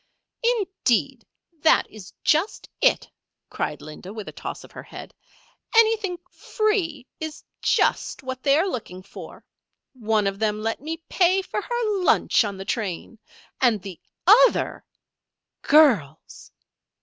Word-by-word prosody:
"Indeed, 355 - 0 0.3
that 315 - +4
is 200 -3 -12
just 320 +7 +1
it!" - - +3 0.4
cried - - -4
Linda, 155 +5 -10
with 215 -2 -8
a - - -6
toss - - -7
of - - -15
her - - -9
head. - - -11 0.6
"Anything 435 -5 +3
free 375 - -1
is 315 -1 -6 0.2
just - - +1
what 260 -1 -5
they 280 +1 +3
are 350 +5 +2
looking 185 - -6
for. 200 - -12 0.5
One 220 -4 0
of 195 0 -2
them 215 -1 -1
let 225 +2 -2
me 320 +3 -4
pay 375 +1 +2
for 415 - -4
her 450 -3 -1
lunch 345 - +3
on 200 -2 -4
the 190 - -7
train. 215 0 -4 0.4
And 240 -5 +3
the 190 -3 -10 0.2
other 475 +7 +4 0.4
" - - -63
"Girls!" 215 - +2
270 Hz, 135 wpm, -24 LUFS, -, 0.6 s, that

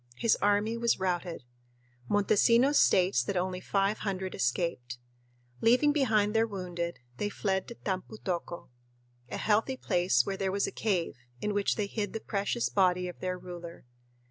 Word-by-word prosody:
His 230 - +3
army 205 +3 +1
was 235 -3 +1
routed. 175 -4 -2 0.7
Montesinos 230 +7 +4
states 180 -9 +4
that 185 +10 -2
only 180 0 -2
five 195 +2 0
hundred 190 -2 -3
escaped. 125 -3 -1 0.6
Leaving 250 +6 +4
behind 215 -8 +2
their 225 0 +3
wounded, 175 -4 -4 0.2
they 205 - -1
fled 190 -2 -1
to 235 - -8
"Tampu 190 +1 -4
tocco," 175 -3 -4 0.6
a - - -4
healthy 225 +5 +1
place 175 - +2
where 195 - -3
there 190 -1 -1
was 200 +1 +1
a - - -4
cave, 185 - -1 0.2
in 210 +9 -2
which 205 -1 +1
they 210 - -1
hid 205 0 -4
the 225 - -3
precious 205 +3 -1
body 180 -2 +2
of 180 - -8
their 185 0 -2
ruler. 175 -3 -9
195 Hz, 160 wpm, -30 LUFS, 180-215 Hz, 0.7 s, Montesinos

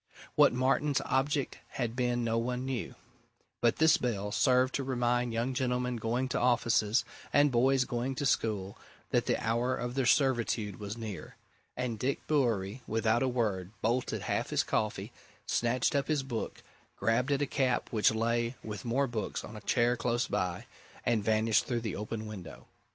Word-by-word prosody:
What - - +6
Martin's 135 +3 +1
object 135 +1 0
had 120 -3 -2
been 120 -1 0
no 115 0 +1
one 125 +1 -2
now 135 - -2
knew 120 - -4 0.7
but 120 -1 +3
this 160 -1 +5
bell 105 -4 -2
served 125 +3 +3
to 140 - -1
remind 125 -2 0
young 115 +3 -1
gentlemen 125 -1 -1
going 120 +3 -1
to - - 0
offices, 120 -2 +2 0.3
and 145 0 +4
boys 130 +2 +3
going 125 +2 -2
to 145 - -2
school, 105 -6 0 0.3
that - - +1
the - - +2
hour 120 +3 0
of 120 0 -4
their 130 -1 0
servitude 120 -7 +1
was 105 +1 -5
near. 105 -8 -7 0.4
And 120 -3 -2
Dick 135 +4 -1
Bewery, 120 -6 0
without 115 +1 +1
a 130 - +2
word, 105 -8 -1
bolted 120 +3 0
half - - -1
his - - +2
coffee, 105 -1 -2 0.3
snatched 120 +3 +1
up 140 - +1
his 150 -3 +1
book, 120 -4 -5 0.3
grabbed 120 +5 +1
at 140 0 +2
a - - +2
cap 130 -2 0
which 110 -3 +4
lay 115 +2 0
with 105 -3 -6
more 130 +4 +1
books 120 -4 -3
on 110 - -9
a 105 - -8
chair 120 0 +2
close 120 +1 0
by, 90 -4 -2 0.4
and 115 -3 +2
vanished 110 0 +2
through 120 -2 -1
the 110 -5 -3
open 110 +2 -4
window. 95 -6 -9
120 Hz, 175 wpm, -31 LUFS, 110-130 Hz, 0.7 s, What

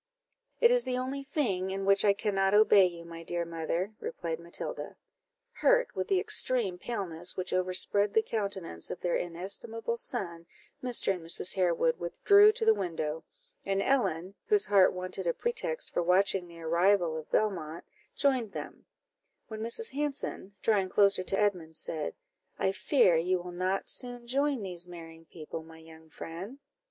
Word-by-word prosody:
"It 475 0 +6
is - - +4
the 250 -1 -2
only 260 +2 -3
thing 230 -10 -1
in 195 0 -3
which 195 0 +4
I 200 - +5
cannot 195 -1 +1
obey 210 -3 +6
you, 170 -1 -9
my 165 0 -9
dear 170 +1 -3
mother," 170 +4 -3
replied 165 -1 -4
Matilda. 170 - -6 0.6
Hurt - - +2
with - - -2
the 390 -3 +2
extreme 255 - +2
paleness 180 -6 -2
which 185 0 -3
overspread 185 +3 +1
the 220 - +4
countenance 195 - -3
of - - -5
their 175 - 0
inestimable 200 +7 -3
son, 170 -10 -5 0.4
Mr. 245 -5 +1
and 180 - -7
Mrs. 170 +2 0
Harewood 170 -3 +1
withdrew 405 - +5
to 450 +1 -3
the 445 - +6
window; 160 - -3 0.4
and 195 0 -1
Ellen, 195 -7 0
whose 415 -2 +5
heart 195 -2 +5
wanted 185 0 -4
a 170 - +1
pretext 485 +1 -1
for - - +1
watching 180 +1 +2
the 170 -1 -13
arrival 170 +1 +2
of 160 -1 -7
Belmont, 170 -6 -1 0.3
joined 255 -7 +1
them; - - -8 0.6
when 220 -1 -6
Mrs. 235 - +1
Hanson, 275 -8 -4
drawing 200 -4 +2
closer 200 -1 +4
to 195 +1 0
Edmund, 180 -6 -1
said 155 -2 -3 0.4
"I 190 - +1
fear 195 - +3
you 180 +3 +1
will 180 0 -8
not 185 +2 -2
soon 245 -1 -1
join 275 -1 0
these 180 -2 -3
marrying 165 -2 -11
people, 160 0 -8
my 160 0 -14
young 160 0 -16
friend?" 180 - -8
190 Hz, 165 wpm, -30 LUFS, 170-235 Hz, 0.6 s, It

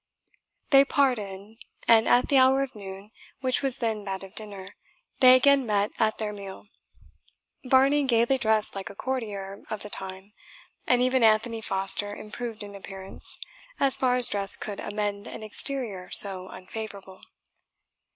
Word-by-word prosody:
They 275 -1 +8
parted 220 -7 -1 0.3
and 225 -1 +5
at 245 - +3
the 275 -2 +4
hour 265 +1 +4
of 270 -1 -7
noon, 195 0 -10 0.3
which 255 -1 0
was 270 -3 0
then 220 -3 -2
that 195 -1 -4
of 190 0 -12
dinner, 200 -3 -6 0.4
they 255 -1 +8
again 280 +1 +4
met 205 -3 0
at 220 0 +1
their 210 -1 -4
meal, 200 -1 -10 1.0
Varney 270 +3 +3
gaily 240 +1 +2
dressed 220 -2 +2
like 195 -2 -6
a 200 - -11
courtier 205 -6 -5
of 215 - -5
the 210 - -9
time, 190 +1 -9 0.5
and 250 0 +3
even 255 0 +2
Anthony 225 +1 +2
Foster 200 +1 0
improved 220 0 -7
in 205 0 -10
appearance, 195 -1 -9 0.4
as 275 -1 +5
far 250 -1 +2
as 250 -1 +2
dress 200 -1 +4
could 205 -2 -6
amend 205 -1 -4
an - - -8
exterior 215 -4 -3
so 190 -2 +4
unfavourable. 195 -1 -9
215 Hz, 150 wpm, -26 LUFS, 200-255 Hz, 1.0 s, They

